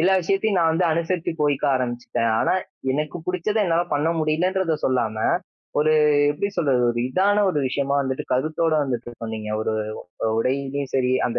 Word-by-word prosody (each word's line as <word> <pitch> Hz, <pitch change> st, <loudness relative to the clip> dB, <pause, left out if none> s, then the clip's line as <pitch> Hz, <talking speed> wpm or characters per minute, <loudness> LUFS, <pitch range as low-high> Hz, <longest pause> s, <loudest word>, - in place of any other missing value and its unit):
எல்லா 190 Hz, +3 st, +4 dB
விஷயத்தையும் 195 Hz, +3 st, 0 dB
நான் 165 Hz, -1 st, +3 dB
வந்து 175 Hz, +2 st, +1 dB
அனுசருச்சு 170 Hz, +1 st, -1 dB
போயிக்க 145 Hz, -1 st, +1 dB
ஆரம்பிச்சுட்டேன். 120 Hz, -2 st, -1 dB
ஆனா, -, -, +2 dB, 0.4 s
எனக்கு 150 Hz, +4 st, -2 dB
பிடிச்சத 185 Hz, +4 st, -1 dB
என்னால 170 Hz, -1 st, +1 dB
பண்ண 145 Hz, +3 st, +1 dB
முடியலன்றத 165 Hz, +2 st, +1 dB
சொல்லாம, 120 Hz, -4 st, 0 dB, 0.6 s
ஒரு 155 Hz, +1 st, +3 dB, 0.4 s
எப்பிடி 200 Hz, +7 st, -2 dB
சொல்றது, 135 Hz, -6 st, +2 dB
ஒரு 120 Hz, 0 st, -2 dB
இதான 205 Hz, +7 st, +2 dB
ஒரு 150 Hz, -, -1 dB
விஷயமா 140 Hz, +2 st, -1 dB
வந்துட்டு 130 Hz, -1 st, -3 dB
கருத்தோடு 155 Hz, +4 st, +1 dB
வந்துட்டு 120 Hz, -2 st, -3 dB
சொன்னீங்க. 110 Hz, -1 st, -5 dB
ஒரு 110 Hz, -, -1 dB, 0.5 s
அ -, -, +2 dB
உடையிலேயும் 135 Hz, +2 st, -2 dB
சரி, 130 Hz, -1 st, +2 dB, 0.2 s
அந்த 120 Hz, -, -2 dB
150 Hz, 160 wpm, -23 LUFS, 130-170 Hz, 0.6 s, எல்லா